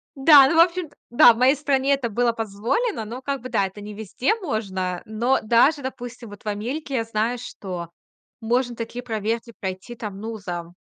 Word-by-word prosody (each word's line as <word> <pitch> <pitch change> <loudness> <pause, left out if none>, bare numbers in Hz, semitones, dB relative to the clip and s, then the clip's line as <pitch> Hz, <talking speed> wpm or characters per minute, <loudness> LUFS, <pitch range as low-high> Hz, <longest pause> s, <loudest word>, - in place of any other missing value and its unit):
Да. 275 0 +8
Ну, 310 - 0
в - - +6
общем-то, 340 -2 +2
да, 240 0 +7
в 225 - -9
моей 260 +4 +4
стране 280 -1 +1
это 265 -4 -1
было 235 +2 +1
позволено, 225 - -2
но 245 +4 -7
как 275 -1 -3
бы, 255 - -7
да, 195 - +1
это 195 +2 -8
не 210 +1 -8
везде 220 - -1
можно. 190 - -3
Но 235 +5 +1
даже, 250 +7 +3
допустим, 245 -2 -7
вот 205 0 -12
в - - -11
Америке- 255 +8 -3
я 230 - +1
знаю, 225 +2 -1
что 185 -8 -7 0.5
можно 240 +2 0
такие 230 +2 -5
проверки 225 +1 -3
пройти 190 +5 -5
там, 210 -4 -7
ну, 220 +1 -5
за 175 -3 -6
235 Hz, 195 wpm, -23 LUFS, 210-265 Hz, 0.5 s, Да